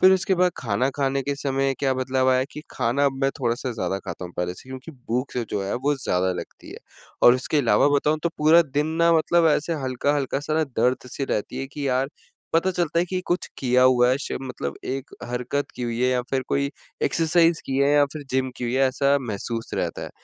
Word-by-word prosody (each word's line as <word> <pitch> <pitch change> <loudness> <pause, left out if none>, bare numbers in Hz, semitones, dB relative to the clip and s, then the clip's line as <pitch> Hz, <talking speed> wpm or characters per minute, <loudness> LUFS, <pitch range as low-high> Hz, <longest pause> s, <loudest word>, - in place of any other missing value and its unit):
फिर 190 0 +7
उसके 190 +1 +2
बाद 180 0 +3
खाना 115 +2 0
खाने 135 -1 0
के 140 +2 -2
समय 135 -1 0
क्या 135 -2 +1
बदलाव 130 0 0
आया 130 - +4
है 130 - +1
कि - - -7
खाना 130 +3 0
अब 140 - +3
मैं 135 - +3
थोड़ा-सा 120 +1 -1
ज़्यादा 95 -3 -2
खाता 90 -2 -7
हूँ 90 - -9
पहले 90 0 -2
से 130 - -14
क्योंकि 130 +4 -8
भूख 125 0 -3
से 125 - -2
जो 100 - -1
है 95 - -2
वो 140 +4 0
ज़्यादा 95 -8 0
लगती 90 - -9
है - - -9 0.4
और 120 - +8
उसके 130 +4 0
अलावा 140 +1 +4
बताऊँ 150 +2 +2
तो 170 - +2
पूरा 160 +3 +6
दिन 145 0 -1 0.2
ना 170 0 +5
मतलब 165 +1 +3
ऐसे 155 +2 +1
हल्का-हल्का 135 +2 0
सा 155 +1 -3
ना 160 - +2
दर्द-सी 125 +1 -1
रहती 105 - -3
है 135 - -3
कि 140 +1 -5
यार, 130 +1 +1 0.4
पता 165 +3 +3
चलता 170 -2 0
है 175 - +3
कि 185 +1 -3
कुछ 175 - -1
किया 125 -1 +3
हुआ 125 -1 +5
है 130 - +1
श - - -3
मतलब 125 -1 -5
एक 135 +1 -4 0.2
हरकत 125 +4 -2
की - - -5
हुई 120 -1 -2
है 125 - +3
या 125 -1 +1
फिर 135 -1 0
कोई 140 0 0 0.3
एक्सरसाइज़ 165 0 +3
की 135 - -2
है 140 +1 +4
या 145 -1 +6
फिर 155 - -6
जिम 130 0 0
की - - -4
हुई 120 +1 -1
है, 135 0 +4
ऐसा 140 +2 +2
महसूस 115 -1 -4
रहता - - -2
है। - - -6
135 Hz, 235 wpm, -24 LUFS, 125-145 Hz, 0.4 s, और